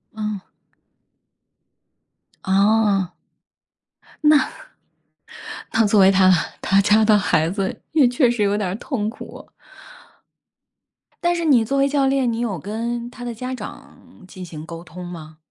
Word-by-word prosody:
嗯。 210 -2 -5 2.0
哦。 200 -1 +2 1.1
那 300 0 +6 1.4
那 225 -1 +3
作 205 0 +4
为 190 0 +7
他 190 -1 +5 0.3
他 195 +1 +3
家 210 +2 +4
的 215 -1 +5
孩 160 -4 +1
子， 195 0 -2 0.2
也 305 -5 +5
确 245 0 +2
实 240 -3 -1
有 200 0 +2
点 205 -3 -2
儿 180 - -3
痛 220 -3 -3
苦。 225 - -10 1.8
但 345 0 +2
是 340 -1 -2
你 255 -7 +4
作 275 +5 -1
为 275 - +3
教 280 -1 +1
练， 270 -2 +1
你 230 - -3
有 220 -7 -2
跟 235 +6 -4
他 245 0 -11
的 240 - -4
家 250 +3 -5
长 220 - -12
进 185 -1 -9
行 155 -2 -9
沟 165 0 -9
通 180 +2 -10
吗？ 160 -3 -10
215 Hz, 150 characters per minute, -21 LUFS, 190-245 Hz, 2.0 s, 为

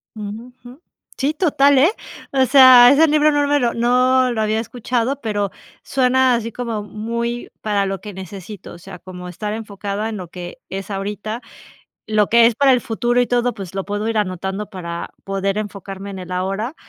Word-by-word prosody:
Ujú, 215 +3 -7
jum, 250 +3 -13 0.4
sí, 280 +3 0
total, 285 -4 +3
eh, 300 +8 +5 0.4
o 265 -1 +3
sea, 255 -2 +8
ese 315 +3 +5
libro 305 0 +3
no 290 -1 +1
me 290 0 +2
lo 240 -2 0
no 250 +2 +3
lo 225 -2 -1
había 215 +1 0
escuchado, 245 +3 -2
pero 205 -3 -2 0.3
suena 260 -1 +2
así 230 -1 -2
como 230 -2 -4
muy 235 +3 -4
para 205 -2 0
lo 195 -1 -4
que 210 0 -8
necesito, 190 +1 -9
o - - -11
sea, 185 +1 -10
como 180 -1 -9
estar 210 +4 -5
enfocada 210 0 -4
en 215 - -5
lo 180 -3 -8
que 175 +5 -8
es 195 +1 -6
ahorita, 205 +3 -4 0.7
lo 215 -1 +2
que 235 0 +6
es 235 - +2
para 275 +1 +5
el 250 - +3
futuro 240 +2 0
y 245 - +2
todo, 245 -1 0
pues 195 -3 -8
lo 195 - -3
puedo 205 +2 -3
ir 225 - 0
anotando 195 +1 -3
para 170 -4 -6
poder 195 0 -2
enfocarme 200 -1 -6
en 190 - -7
el 180 0 -8
ahora. 195 - -2
220 Hz, 190 wpm, -19 LUFS, 195-250 Hz, 0.7 s, sea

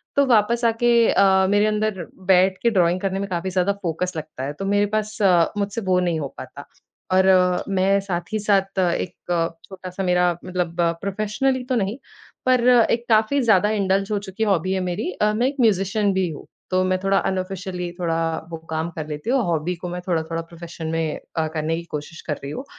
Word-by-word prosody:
तो 280 - +4
वापस 235 -1 +3
आके 230 +1 +2 0.2
अ, 190 -1 +4
मेरे 205 +1 +3
अंदर 210 -5 -1 0.3
बैठ 185 +1 +4
के 235 - +5
ड्राइंग 180 -2 +2
करने 195 -1 -1
में 200 0 -4
काफ़ी 180 +1 -2
ज़्यादा 185 +2 +1
फ़ोकस 180 +2 -2
लगता 155 -4 -6
है। 145 +2 -3
तो 195 +6 -6
मेरे 205 +1 +2
पास 215 0 -4
अ, 175 -4 +4
मुझसे 205 +2 -2
वो 185 -2 +2
नहीं 175 -3 0
हो 140 - -3
पाता। - - -9 0.5
और 190 0 +4 0.4
मैं 195 +1 +2
साथ 180 -1 -4
ही - - +2
साथ 195 -2 +1
एक 175 -1 0 0.5
छोटा-सा 190 0 -7
मेरा 180 -1 +3
मतलब 180 -2 -2 0.3
प्रोफेशनली 215 +7 -1
तो 255 - +1
नहीं, 210 +1 -1 0.5
पर 250 -1 +3
एक 235 -1 +4
काफ़ी 225 +6 +3
ज़्यादा 210 -4 +4
इंडल्ज़ 195 -1 0
हो 205 - +1
चुकी 200 +2 -4
हॉबी 190 -3 +1
है 190 - 0
मेरी 180 0 -2
अ, 210 +2 +1
मैं 240 +4 +1
एक 275 - -3
म्यूज़िशियन 200 -1 +2
भी 190 -1 +1
हूँ। 150 - -8 0.3
तो 185 0 +2
मैं 185 0 +1
थोड़ा 195 0 +2
अनऑफिशियली 185 -1 -3
थोड़ा 165 -2 0 0.3
वो 165 - -4
काम 160 +1 -1
कर 155 -2 -6
लेती 150 +8 -5
हूँ। 270 - +3
हॉबी 170 +1 -1
को 180 - -3
मैं 180 0 -5
थोड़ा-थोड़ा 165 -1 -1
प्रोफ़ेशन 165 -1 -9
में 165 -2 -2 0.2
अ, 160 - +1
करने 160 +1 -1
की 170 - -6
कोशिश 150 +2 -6
कर - - +2
रही 140 - -5
हूँ। 260 - -6
190 Hz, 200 wpm, -22 LUFS, 175-210 Hz, 0.5 s, के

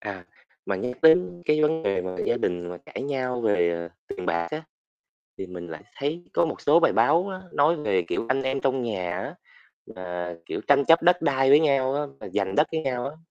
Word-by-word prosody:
À, 100 -4 -7 0.4
mà 95 - -1
nhắc 125 +5 -5
đến 175 +2 +4
cái 155 0 +2
vấn 160 +1 +1
đề 100 -2 0
mà 90 0 -5
gia - - +2
đình 90 0 -2
mà 90 0 -7
cãi - - -6
nhau 130 -3 -2
về, 100 -6 +2
ờ, 85 0 -4 0.2
tiền 90 - -6
bạc 85 0 0
á, 155 - -4 0.8
thì 95 - -5
mình 90 -1 -8
lại 80 -1 -9
thấy 155 +5 -3
có 170 - +3
một 160 - -4
số 160 +4 +4
bài - - +4
báo 180 +4 +3
á 190 -1 -6
nói 155 +4 +3
về, 100 - 0
kiểu, 100 +6 -3
anh 135 +1 +1
em 135 +1 -1
trong 135 -1 0
nhà 95 -7 -3
á, - - -6 0.6
mà, 90 -1 -5
kiểu, - - -4
tranh 140 -1 +5
chấp 165 0 +5
đất 180 0 +4
đai 135 -3 +2
với 145 +2 +8
nhau 135 -3 +2
á, 145 - 0 0.2
mà - - -8
giành 95 -2 -1
đất 150 - +4
với 160 - 0
nhau 125 -4 -2
á. 150 - -10
130 Hz, 230 wpm, -25 LUFS, 90-155 Hz, 0.8 s, với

